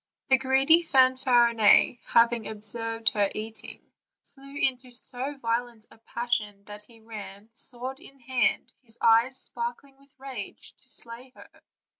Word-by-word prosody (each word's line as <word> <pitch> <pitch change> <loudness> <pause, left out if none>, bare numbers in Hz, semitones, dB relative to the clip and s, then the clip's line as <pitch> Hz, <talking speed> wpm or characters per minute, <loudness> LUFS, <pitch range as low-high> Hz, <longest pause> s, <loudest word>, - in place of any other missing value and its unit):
The 265 - +6
greedy 270 +5 +4
Fanfarinet, 255 -6 +4
having 235 -1 +3
observed 225 +1 -1
her 205 -2 0
eating, 220 +1 -8 0.4
flew 275 0 -16
into 255 -2 +1
so 255 +3 -3
vio 235 0 0
lent 230 -3 -18
a - - -19
passion 225 -4 -3
that 205 +1 -11
he 225 +2 -20
ran, 210 -1 -10
sword 260 +1 -3
in 275 -1 -17
hand, 255 0 -1
his 230 -3 -6
eyes 230 +3 +4
sparkling 245 +3 -5
with 275 0 -25
rage, 260 -7 -7
to - - -23
slay 235 +2 -4
her. - - -14
240 Hz, 140 wpm, -27 LUFS, 225-265 Hz, 0.4 s, The